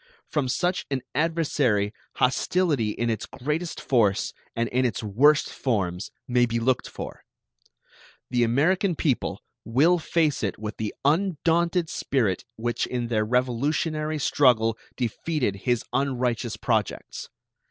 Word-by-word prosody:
From 135 -4 0
such 175 +8 0
an 135 -2 -2
adversary 145 -9 +1 0.2
hostility 140 -2 +1
in 120 +2 -1
its 110 -1 -3
greatest 150 +5 -3
force 110 -7 +2 0.2
and 115 0 0
in 125 +1 +1
its 120 -2 -1
worst 135 +9 +4
forms 95 -7 -1 0.2
may 125 -1 +3
be 115 0 -1
looked 125 +2 +1
for. - - -8 1.1
The 120 -1 +3
American 170 - +2
people 140 -5 -1 0.2
will 150 +11 +3
face 155 -3 +1
it 100 -4 -2
with 105 0 -6
the 110 -1 -3
undaunted 170 +1 +2
spirit 110 - -1
which 120 +1 -1
in 120 -2 -3
their 110 -2 +2
revolutionary 145 +6 0
struggle 120 -6 +3 0.2
defeated 125 - -1
his 120 -2 +2
unrighteous 125 -4 0
projects. 110 -3 -2
125 Hz, 125 wpm, -25 LUFS, 115-155 Hz, 1.1 s, worst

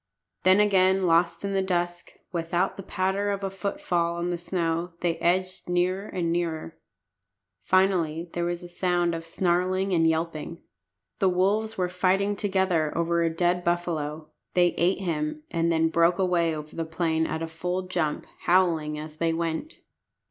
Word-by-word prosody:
Then 185 +2 +5
again 190 -2 +4
lost 170 +2 +2
in 200 - -2
the 195 - +2
dusk, 175 -2 -2 0.2
without 170 0 -1
the - - -7
patter 190 +2 -1
of 200 -1 -2
a 195 - -2
footfall 175 -3 -1
on 170 +1 -2
the - - 0
snow, 170 -1 -2
they 170 -2 0
edged 185 +2 0
nearer 185 +3 0
and 170 -3 -2
nearer. 165 -2 -2 0.9
Finally 175 - +2
there 175 0 -1
was 175 0 -3
a - - -7
sound 175 -1 0
of 165 0 -5
snarling 185 +2 +1
and 165 -2 +4
yelping. 160 0 -2 0.6
The 190 - +4
wolves 205 +5 +1
were 180 -1 +1
fighting 190 +3 +1
together 190 -6 +1
over 170 0 +1
a 165 - +2
dead 175 +2 +1
buffalo. 160 -3 -2 0.3
They 175 -1 +5
ate 180 +3 +1
him, 155 -3 -2
and 170 0 +1
then 160 0 +2
broke 170 +1 +3
away 175 -4 +1
over 150 0 -8
the 165 - -1
plain 160 0 0
at 160 +1 -3
a - - -2
full 180 +3 -3
jump, 175 -5 -2 0.2
howling 165 -4 +2
as 155 0 -8
they 165 0 +1
went. 165 - -3
175 Hz, 165 wpm, -26 LUFS, 165-185 Hz, 0.9 s, Then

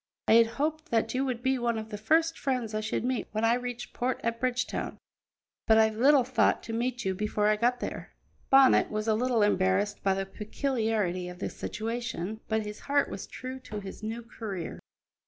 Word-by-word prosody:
"I - - +3
had 230 0 +7
hoped 310 +2 -1
that 225 -1 +1
you 260 +1 +1
would 245 -2 -3
be 265 0 +2
one 235 -1 0
of 220 0 -5
the 210 - -5
first 325 +8 +2
friends 250 -5 -1
I 215 - 0
should 220 +1 -2
meet 255 -2 -1
when 215 +1 +1
I 230 - +4
reached 245 -1 -4
port 250 +1 -1
at 230 0 -1
Bridgetown, 255 0 -2 0.7
but 220 - +6
I 220 0 +6
little 260 +5 +4
thought 260 +2 +2
to 225 - -6
meet 240 0 -2
you 190 - +1
before 210 +1 0
I 215 - +4
got 240 +3 +1
there." - - -6 0.3
Bonnet 270 -1 +6
was 215 +1 -3
a 220 - +4
little 235 0 +2
embarrassed 200 0 +1
by 195 -1 +2
the 195 0 -2
peculiarity 210 -4 -1
of 180 - -9
the 200 - -4
situation, 225 -3 -4
but 220 -1 0
his 210 0 -7
heart 285 0 +1
was - - -6
true 255 +1 -7
to 215 -4 -7
his 195 0 -9
new 225 +2 -4
career. 210 -7 -6
225 Hz, 205 wpm, -29 LUFS, 210-250 Hz, 0.7 s, had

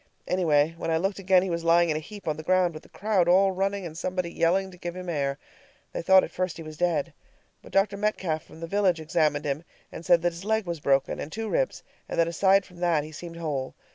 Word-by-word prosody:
Anyway, 160 -4 +2
when - - -3
I 160 - +2
looked 195 +4 -1
again 185 -1 +4
he 190 - -2
was 170 0 -2
lying 170 0 +4
in - - 0
a - - -1
heap 205 +5 -11
on 155 - 0
the 155 - -7
ground, 180 +1 +2
with 155 - -8
the - - -20
crowd 200 -4 +1
all 190 +2 +5
running, 195 +1 -1
and 160 -2 -7
somebody 180 0 -3
yelling 190 +4 +1
to 180 - -14
give 175 0 -6
him 185 0 -7
air. 140 -4 -1 0.6
They - - -3
thought 190 +2 +6
at - - -5
first 185 -2 -2
he 165 - -7
was 155 0 -9
dead. 165 -3 0 0.5
But - - -14
Dr. 200 +1 +2
Metcalf 190 -6 -1
from 160 - -15
the - - -3
village 185 -1 +1
examined 155 -2 0
him, 145 +2 -2 0.3
and 160 - -8
said 175 -1 +4
his 175 +1 -1
leg 220 0 0
was 170 -2 -4
broken, 135 -1 +1
and 150 - -6
two 225 +3 -4
ribs, - - -1 0.3
and - - -2
that 165 - +4
aside 190 +3 +3
from 180 - -17
that 170 -4 +1
he 155 - -9
seemed 165 +2 -8
whole. 145 -6 -3
175 Hz, 250 wpm, -26 LUFS, 160-190 Hz, 0.6 s, thought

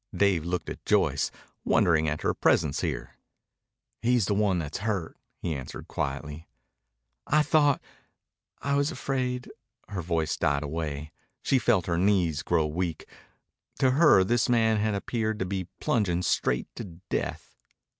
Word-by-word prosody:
Dave 95 -6 +3
looked 85 -1 -2
at - - -7
Joyce, - - +2 0.3
wondering 80 -3 +3
at 75 - -3
her - - +2
presence 70 -2 +2
here. - - -4 0.8
"He's 120 -3 +3
the 100 - +1
one 100 -2 +2
that's 80 0 -3
hurt," 100 -5 -2 0.2
he 80 - -3
answered 65 -3 -7
quietly. 75 +4 -4 0.8
"I 150 +1 +4
thought 145 -1 +3 0.8
I 140 - 0
was 140 +1 +2
afraid 125 -2 -2 0.2
" - - -42
Her 95 -3 -3
voice 80 -2 -1
died 70 -3 +1
away. 75 -1 -4 0.3
She 135 - +3
felt 95 -7 +2
her 85 -1 0
knees 90 -6 +2
grow 80 - +1
weak. 80 +1 -3 0.7
To 130 - +3
her 145 - +6
this 120 +5 +1
man 110 -2 +3
had 105 0 0
appeared 110 +1 -2
to 95 - -2
be 95 -1 -3
plunging 90 -6 +1
straight 60 -7 0
to - - -4
death. 90 0 -5
95 Hz, 150 wpm, -27 LUFS, 80-115 Hz, 0.8 s, her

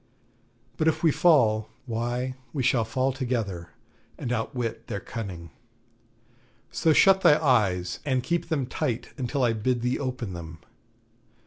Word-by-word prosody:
But 160 - +1
if 160 - +1
we 160 - +5
fall, 115 -11 +3 0.2
why, 120 +2 -2 0.2
we 140 -4 -1
shall 120 -3 +2
fall 130 +4 0
together, 115 -10 -3 0.5
and 120 - -4
outwit 115 -1 -3
their 100 - -3
cunning. 90 -9 -7 1.2
So 160 - +2
shut 190 +4 +5
thy 150 - +6
eyes, 100 - +1
and 130 -3 0
keep 170 +4 -1
them 145 -5 0
tight 120 -2 -3
until 135 0 -2
I 120 -2 +3
bid 120 +2 -1
thee 125 +1 0
open 125 -7 -4
them.' 80 -2 -8
125 Hz, 140 wpm, -26 LUFS, 110-135 Hz, 1.2 s, thy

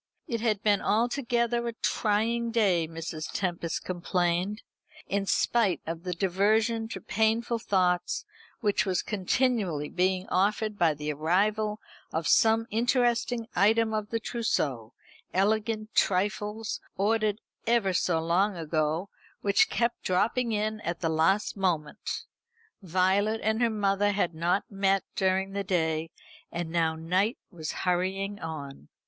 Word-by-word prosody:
It 230 -3 -3
had 215 -3 0
been 205 -2 +3
altogether 235 0 +1
a 235 - -3
trying 225 +2 0
day, 195 -8 +2
Mrs. 160 -1 -6
Tempest 170 -3 -2
complained: 180 +3 -1 0.4
in 200 0 -1
spite 215 -5 +2
of 165 0 -4
the 180 0 -3
diversion 215 +5 +1
to - - -6
painful 225 +2 0
thought 180 -4 +1 0.4
which 205 -3 +2
was 185 -3 0
continually 200 - 0
being 185 +1 0
offered 210 +2 +1
by 165 -3 +3
the 150 +1 -3
arrival 210 +8 +1 0.3
of 160 0 -2
some 225 0 +4
interesting 240 0 +1
item 220 +3 +3
of 215 -1 -2
the 230 - -1
trousseau, 140 - -2 0.4
elegant 215 +2 0
trifles, 210 +3 0 0.2
ordered 215 +1 +1 0.3
ever 230 -5 +3
so 175 -2 +1
long 180 +4 +1
ago, 160 +2 -1 0.3
which 205 - +3
kept 235 0 0
dropping 230 +6 +1
in 215 0 -1
at 170 -3 -4
the 165 - +1
last 165 +6 +2
moment. 180 -3 -2 0.6
Violet 190 +4 +2
and 220 +2 +1
her 235 - +4
mother 205 -1 +1
had 185 -4 0
not 170 +4 +1
met 195 -1 +1
during 190 0 +1
the 200 0 -2
day, 160 -3 0 0.4
and 170 -1 -4
now 165 -1 +1
night 185 +8 0
was 160 -4 -5
hurrying 190 +3 -1
on. 140 - -7
195 Hz, 130 wpm, -28 LUFS, 175-220 Hz, 0.6 s, some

